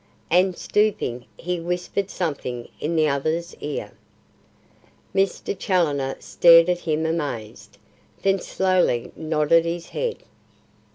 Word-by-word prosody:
And 180 +1 +3
stooping, 205 - 0
he 180 0 -3
whispered 180 +3 -2
something 135 -10 -4
in 165 +3 -2
the 155 -1 +3
other's 160 +5 -1
ear. 140 -8 -5 1.2
Mr. 195 +1 0
Challoner 150 -9 0
stared 170 0 +6
at 175 -1 +1
him 160 -2 -1
amazed, 145 -10 -4 0.5
then 195 0 +3
slowly 185 -11 +1
nodded 160 +1 +2
his 170 0 -4
head. 485 -2 -3
165 Hz, 110 wpm, -23 LUFS, 150-180 Hz, 1.2 s, stared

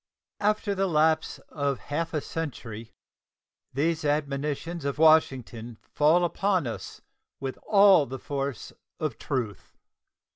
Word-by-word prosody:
After 210 0 +1
the 195 0 0
lapse 160 -1 +2
of 140 -3 -1
half 165 +3 -3
a 155 - -1
century 115 -10 -6 0.8
these 155 +4 0
admonitions 150 +2 -2
of 140 0 -2
Washington 130 -7 +3
fall 160 +4 +3
upon 185 -1 0
us 115 - -6 0.4
with 135 -1 -5
all 200 -7 +6
the 130 +2 -5
force 140 -1 -4 0.3
of 155 -8 -3
truth. 120 - -4
150 Hz, 115 wpm, -27 LUFS, 135-165 Hz, 0.8 s, all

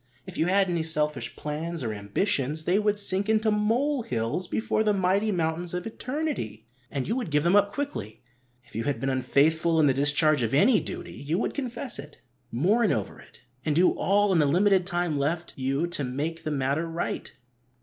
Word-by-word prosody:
If - - -10
you 160 - +1
had 195 +1 +3
any 170 -2 0
selfish 150 -6 -1
plans, 155 +1 -4
or 110 -2 -2
ambitions, 140 - -1
they 185 +3 +3
would 210 -1 +1
sink 200 0 +2
into 220 0 +2
mole 240 +7 +1
hills 125 - -2
before 220 +2 0
the 210 -1 +2
mighty 195 +3 +1
mountains 170 0 -1
of 180 - -4
eternity, 250 - -4 0.2
and 135 -2 -3
you 225 - 0
would 250 -9 -3
give 150 -1 +1
them 175 +3 +3
up 205 0 +4
quickly. 120 - -5 0.4
If 115 - -19
you 115 - -2
had 145 - -1
been 135 0 -1
unfaithful 160 +6 +2
in 155 - +5
the 135 - +4
discharge 150 +1 +3
of 115 +2 0
any 215 - +5
duty, - - -7
you 150 +5 -3
would 220 - -1
confess 255 -2 -4
it, 150 - -11 0.3
mourn 200 - +2
over 105 -3 -3
it, - - -18 0.2
and 150 -2 0
do 180 +3 +5
all 205 +1 +2
in 170 - +3
the 150 - +4
limited 185 +4 +3
time 175 -5 -1
left 165 +5 -2
you 135 +4 -1
to 160 -4 -2
make 145 +6 -3
the - - -2
matter 140 +3 -1
right. 165 +1 -4
165 Hz, 200 wpm, -26 LUFS, 140-205 Hz, 0.4 s, in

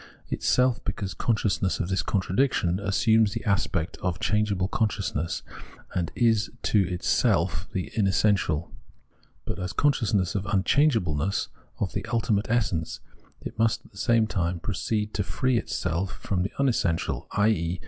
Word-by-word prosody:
Itself, 125 -2 +2
because 100 -2 -3
consciousness 105 +1 0
of 90 - -1
this 95 -1 +1
contradiction, 95 -2 +1
assumes 105 +1 +3
the - - -5
aspect 95 -3 0
of 90 -1 -2
changeable 105 -3 +1
consciousness 95 -7 -1 0.5
and 90 -3 -1
is 115 -2 +2
to 95 -4 +2
itself 90 -2 +1
the 95 - -3
imessential; 95 -5 +1 0.7
but - - -4
as 90 0 -3
consciousness 110 -10 +1
of 100 -1 -2
unchangeableness, 100 - +1 0.3
of 95 -3 -2
the - - -2
ultimate 110 -3 0
essence, 100 -9 0 0.4
it - - -8
must, 115 +1 +1
at - - -18
the 100 - -17
same 115 -2 +3
time, 90 -4 -1
proceed 105 +3 -2
to 100 - 0
free 130 +4 +1
itself 90 +1 -2
from 95 -3 -2
the 95 - -1
imessential, 115 -11 0
i.e. 90 -5 +1
100 Hz, 140 wpm, -26 LUFS, 90-110 Hz, 0.7 s, assumes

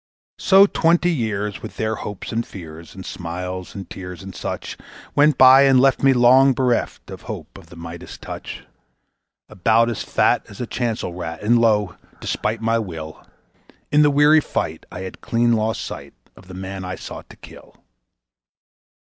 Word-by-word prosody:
So 195 +1 +6
twenty 175 -2 +2
years, 105 - -2
with - - -9
their 110 0 -1
hopes 105 -2 -7
and 115 +1 -1
fears 80 -4 -11
and 95 - -9
smiles 90 +2 -6
and 95 -3 -7
tears 90 -1 -9
and 95 0 -9
such, - - -5 0.4
Went 145 -1 +4
by 130 +1 +8
and 135 -2 +5
left 135 0 +3
me 135 - +5
long 130 +2 +5
bereft 125 -1 -1
of - - -9
hope - - -8
of - - -13
the - - -14
Midas 85 0 -9
touch; - - -8 0.8
About 110 +3 +2
as 115 - -4
fat - - +1
as 100 - -12
a 125 - -2
chancel 115 -6 -3
rat, 85 -1 -6
and 120 +3 +4
lo! 105 -5 +2 0.2
despite 110 +1 -2
my 115 0 +2
will, 80 -7 -7 0.7
In 150 - +5
the 150 - +5
weary 145 +2 +5
fight 80 - -4
I 90 - -7
had 95 -1 -8
clean 120 0 +1
lost 110 0 0
sight - - -8 0.2
of 95 - -17
the 95 - -10
man 95 0 -6
I 90 0 -5
sought - - -9
to - - -13
kill. - - -15
110 Hz, 175 wpm, -21 LUFS, 95-130 Hz, 0.8 s, by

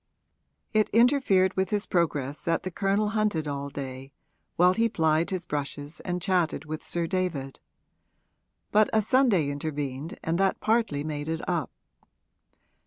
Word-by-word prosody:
It 215 -1 +3
interfered 230 -6 +4
with 190 -1 0
his 205 -1 0
progress 150 -5 -1
that 165 -1 +1
the 185 - -4
Colonel 200 +3 +1
hunted 210 -8 0
all 140 0 -3
day, 135 -1 -7 0.4
while 180 +1 +5
he 230 +3 +2
plied 160 -4 +1
his 185 -2 -3
brushes 145 +1 -4
and 180 -1 -3
chatted 175 -6 +1
with 155 0 -5
Sir 170 -1 -2
David; 165 -7 -2 1.1
but 215 0 +4
a 220 - +4
Sunday 215 - +3
intervened 145 0 -4
and 165 +2 0
that 195 0 +2
partly 220 -11 +1
made 150 0 -4
it 165 0 -3
up. 170 -6 -1
170 Hz, 145 wpm, -27 LUFS, 145-195 Hz, 1.1 s, while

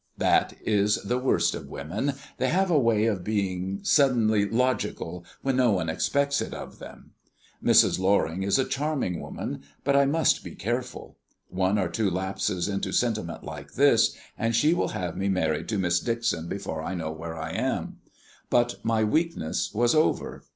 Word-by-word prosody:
That - - +2
is 105 -1 +3
the 125 +5 -1
worst 130 - +2
of - - -7
women 100 - -3 0.3
they 130 - +1
have 190 +2 +2
a 155 - +5
way 115 -4 +2
of 100 -6 0
being 95 -2 -2
suddenly 110 -7 +3
logical 115 -8 -1 0.2
when 135 -1 +1
no 125 -4 +4
one 90 -4 -1
expects 140 - +1
it - - -5
of - - -9
them. - - -12 0.5
Mrs. - - +5
Loring 95 -2 +1
is 100 +4 +2
a 130 - +2
charming 140 - -2
woman, 70 - -6 0.2
but 140 0 +2
I 140 0 +5
must 160 +2 +2
be - - -9
careful. - - -4 0.3
One 95 +2 +1
or 95 -3 +1
two 105 +3 0
lapses 95 0 -2
into 100 -1 -2
sentiment 110 -8 -1
like - - -9
this, - - +4 0.2
and 115 0 0
she 150 +8 +4
will 175 - 0
have 90 -3 -4
me 100 +1 -1
married 90 -5 0
to 110 - 0
Miss 90 -2 +2
Dixon 115 -7 -1
before 80 -5 -4
I 95 +4 -4
know 80 -3 -3
where 80 +1 -7
I 80 0 -5
am. - - -2 0.5
But 120 0 +1
my 115 -1 +1
weakness 155 - 0
was 120 +2 +2
over. 155 0 0
105 Hz, 175 wpm, -26 LUFS, 90-125 Hz, 0.5 s, a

